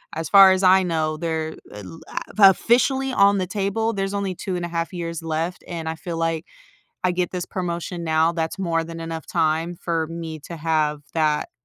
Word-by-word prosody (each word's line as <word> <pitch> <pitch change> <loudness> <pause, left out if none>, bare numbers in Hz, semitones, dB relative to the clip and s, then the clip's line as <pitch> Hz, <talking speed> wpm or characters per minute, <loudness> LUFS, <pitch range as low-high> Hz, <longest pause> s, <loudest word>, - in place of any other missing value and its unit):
as 165 - -4
far 195 -1 +9
as 190 +1 +1
I 190 +1 +6
know, 160 -3 -1
there, 160 -1 -3 0.2
uh, 105 0 -9 0.5
la 200 -2 +9
officially 265 +6 +2
on 200 -4 +4
the 185 -1 -1
table, 205 +4 -1
there's 195 -1 -2
only 200 -2 -2
2.5 175 -2 -3
years 170 -2 -4
left, 165 +2 -3
and 165 -2 -5
I 160 - -3
feel 165 +1 -6
like 165 0 -1 0.6
I - - +2
get 180 0 -1
this 180 -1 -3
promotion 175 -1 -4
now, 160 0 +2
that's 165 0 -3
more 170 -3 0
than 165 0 -8
enough 165 0 -6
time 160 +2 0
for 165 -1 -2
me 165 -1 -6
to 170 +3 -8
have 155 -2 0
that, 155 -2 0
170 Hz, 185 wpm, -23 LUFS, 160-185 Hz, 0.6 s, far